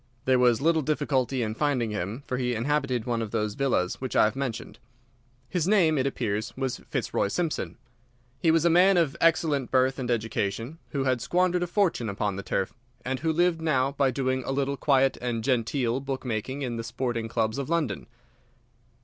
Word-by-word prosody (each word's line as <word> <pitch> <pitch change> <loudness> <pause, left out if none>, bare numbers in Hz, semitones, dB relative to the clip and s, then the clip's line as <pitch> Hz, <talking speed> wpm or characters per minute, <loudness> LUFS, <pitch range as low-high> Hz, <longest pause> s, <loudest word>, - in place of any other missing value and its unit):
There 130 -1 +4
was 120 -1 +4
little 160 +1 +3
difficulty 135 -4 0
in 110 -1 -2
finding 125 -3 0
him, 105 +6 -4
for 125 - -2
he 125 -1 -1
inhabited 130 -1 0
one 120 -2 -1
of 110 - -3
those 105 -1 -1
villas 120 -8 0
which 130 - -4
I - - +6
have 110 +3 +1
mentioned. 135 -4 -4 0.7
His 175 +1 -1
name, 185 -7 +4
it 130 - +1
appears, 110 -4 -3
was 130 -2 -2
Fitzroy - - 0
Simpson. 165 - -2 0.6
He 165 - +2
was 165 0 +3
a - - +6
man 185 +3 +5
of 160 -5 +2
excellent 155 -5 +2
birth 130 +1 +2
and 125 -2 -3
education, 115 +4 -2
who 140 -2 -1
had 130 -3 +1
squandered 180 +5 +1
a 175 - 0
fortune 175 - +1
upon 100 0 -2
the 100 - -4
turf, 95 -1 -2 0.3
and 130 0 -2
who 160 +4 0
lived 170 0 +2
now 135 -4 +1
by 140 -1 +2
doing 130 0 -1
a - - -3
little 140 0 0
quiet 135 -1 +2
and 120 -2 -2
genteel 125 0 0
book 135 -1 -5
making 125 +4 -3
in 120 -3 -3
the 115 - -4
sporting 120 -1 -2
clubs 110 +2 -1
of 140 - -4
London. 155 - -1
130 Hz, 190 wpm, -27 LUFS, 115-150 Hz, 0.7 s, I